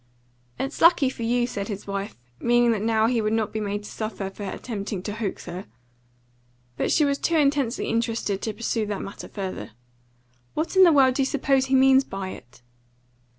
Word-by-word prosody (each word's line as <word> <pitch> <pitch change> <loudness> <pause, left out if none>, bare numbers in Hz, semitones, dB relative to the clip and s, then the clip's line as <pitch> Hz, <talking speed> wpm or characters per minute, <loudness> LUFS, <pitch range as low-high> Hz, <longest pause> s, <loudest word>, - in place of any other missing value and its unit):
"It's 270 +2 -4
lucky 325 -6 +5
for 240 - -10
you," 240 +1 +1
said 200 -5 -4
his 205 -2 -6
wife, 200 +1 -4 0.2
meaning 240 0 +3
that 215 -3 0
now 220 0 +2
he 230 0 +2
would 215 0 0
not 220 -2 0
be 220 - -2
made 205 0 -3
to - - -9
suffer 215 -3 -4
for 200 - -12
attempting 200 -2 -5
to 205 - -4
hoax 215 -2 -4
her. 180 +2 -7 1.1
But - - -1
she 305 - +4
was 280 0 0
too 335 - 0
intensely 280 -4 +1
interested 230 -4 -1
to 220 - -3
pursue 225 -1 -1
that 205 -1 -3
matter 195 - -8
further. 190 - -6 0.8
"What 320 +5 -2
in 380 0 +8
the 340 - +6
world 270 -3 +5
do 275 - 0
you 265 - +2
suppose 270 -1 +1
he 265 - +2
means 265 0 +6
by 195 -5 -5
it?" 120 -7 -12
225 Hz, 195 wpm, -25 LUFS, 205-265 Hz, 1.1 s, in